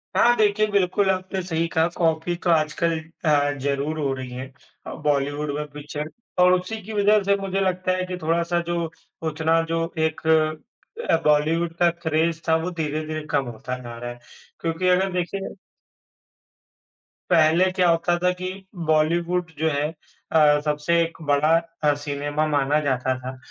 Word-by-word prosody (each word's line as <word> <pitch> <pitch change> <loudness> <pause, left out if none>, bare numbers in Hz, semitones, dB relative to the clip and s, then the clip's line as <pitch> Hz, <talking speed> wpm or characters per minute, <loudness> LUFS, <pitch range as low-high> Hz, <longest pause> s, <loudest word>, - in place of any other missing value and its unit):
हाँ, 240 +1 +5
देखिए, 215 0 +3
बिल्कुल 195 0 +2
आपने 185 +1 -3
सही 165 -2 -1
कहा। 160 0 +2
कॉपी 165 +1 +1
तो 175 - +1
आजकल 160 +1 +2
अ, 155 -3 0
ज़रूर 140 +3 -1
हो 140 -2 0
रही 130 -1 -6
है 125 +1 -5 0.4
अ, - - -5
बॉलीवुड 145 0 0
में 150 0 -3
पिक्चर 150 +1 -6 0.3
और 180 0 +6
उसी 215 +5 -6
की 220 - -7
वजह 210 0 +4
से 200 0 +3
मुझे 195 0 -1
लगता 185 -1 0
है 185 - -1
कि 180 0 -5
थोड़ा-सा 170 +2 +1
जो 170 -1 -2 0.4
उतना 160 +1 +2
जो 165 - +1 0.2
एक 160 0 -3
अ, 160 - 0
बॉलीवुड 160 +3 +2
का 175 -1 +5
क्रेज़ 165 -1 -1
था, 160 - +4
वो 165 +3 -1
धीरे-धीरे 155 -1 -3
कम 135 - +1
होता 125 +2 -5
जा 120 -1 -8
रहा 120 +1 -5
है। 120 - -11 0.4
क्योंकि 165 +2 -1
अगर 185 +1 +3
देखिए 180 +3 -3 1.7
पहले 170 +2 +4
क्या 185 -1 +2
होता 170 +1 +2
था 180 - +4
कि 185 - -3 0.4
बॉलीवुड 170 +3 +1
जो 160 - +2
है 145 0 0 0.4
अ, 150 -2 +5
सबसे 150 +3 +1
एक 165 0 -2
बड़ा 145 +2 +3 0.3
अ, 150 - +4
सिनेमा 145 +1 -2
माना 145 0 +2
जाता 130 -3 0
था 130 +1 -7
160 Hz, 165 wpm, -23 LUFS, 150-180 Hz, 1.7 s, और